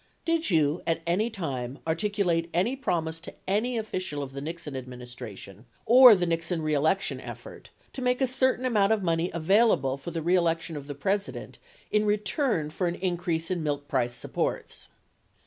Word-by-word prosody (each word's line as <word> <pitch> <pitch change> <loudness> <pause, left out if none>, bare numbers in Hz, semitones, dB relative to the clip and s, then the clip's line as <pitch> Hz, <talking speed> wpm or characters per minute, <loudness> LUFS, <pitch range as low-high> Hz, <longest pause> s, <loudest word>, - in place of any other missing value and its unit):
Did 330 0 +1
you 155 -2 +2
at 165 - 0
any 190 +7 +1
time 135 - -4
articulate 170 0 0
any 205 +10 +2
promise 165 -11 -2
to 165 - -9
any 225 +6 0
official 185 -9 -3
of 135 - -7
the 140 - -6
Nixon 160 -1 -6
administration 125 -5 -9 0.2
or 245 0 +9
the 180 -2 0
Nixon 165 0 -1
re 155 0 0
election 160 +7 +1
effort - - -10 0.2
to 265 - -6
make 250 0 +1
a 265 - +3
certain 260 0 +1
amount 210 -5 +3
of 210 -3 -1
money 165 0 +1
available 170 - +3
for 140 - -7
the 165 -1 -4
reelection 170 -2 +1
of 140 -1 -7
the 145 - -6
President 195 +8 -3 0.3
in 210 0 +2
return 210 - 0
for 180 +3 -1
an 170 - -2
increase 175 -2 -1
in 180 -2 -1
milk 145 -2 -2
price 120 -4 0
supports? - - -3
170 Hz, 170 wpm, -27 LUFS, 150-210 Hz, 0.3 s, or